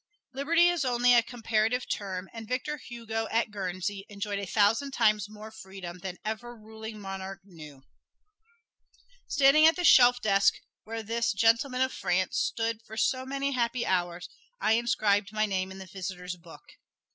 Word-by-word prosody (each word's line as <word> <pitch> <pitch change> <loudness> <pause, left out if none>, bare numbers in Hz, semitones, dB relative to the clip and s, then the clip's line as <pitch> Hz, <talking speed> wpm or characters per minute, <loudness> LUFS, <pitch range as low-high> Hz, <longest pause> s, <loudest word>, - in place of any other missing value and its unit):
Liberty 330 +6 +3
is 350 -3 +1
only 245 -1 +3
a 240 - +7
comparative 230 0 -1
term, 190 -2 -4
and 225 -1 -8
Victor 270 +5 -2
Hugo 225 -3 -5
at 225 -1 0
Guernsey 195 0 -4
enjoyed 200 0 -4
a 200 - -5
thousand 220 +9 +2
times 215 -4 +2
more 215 +1 -10
freedom 190 -4 -9
than 180 0 -6
ever 230 +3 -4
ruling 220 0 -9
monarch 195 -1 -7
knew. 155 -8 -13 1.4
Standing 285 +3 +6
at 325 - +4
the 360 - -3
shelf 245 -6 +7
desk 200 -3 +3 0.3
where 225 0 -5
this 230 +2 0
"Gentleman 230 +5 +2
of 260 0 +1
France" 185 +1 0
stood 225 -1 -1
for 220 -1 -11
so 260 +3 0
many 275 +1 -2
happy 240 -1 0
hours, 175 -1 -1 0.3
I - - +1
inscribed 210 -3 +2
my 215 0 +1
name 190 -2 -2
in 190 - -9
the 190 - -8
"visitors' 180 -1 -6
book." 170 -1 -15
220 Hz, 160 wpm, -28 LUFS, 195-240 Hz, 1.4 s, a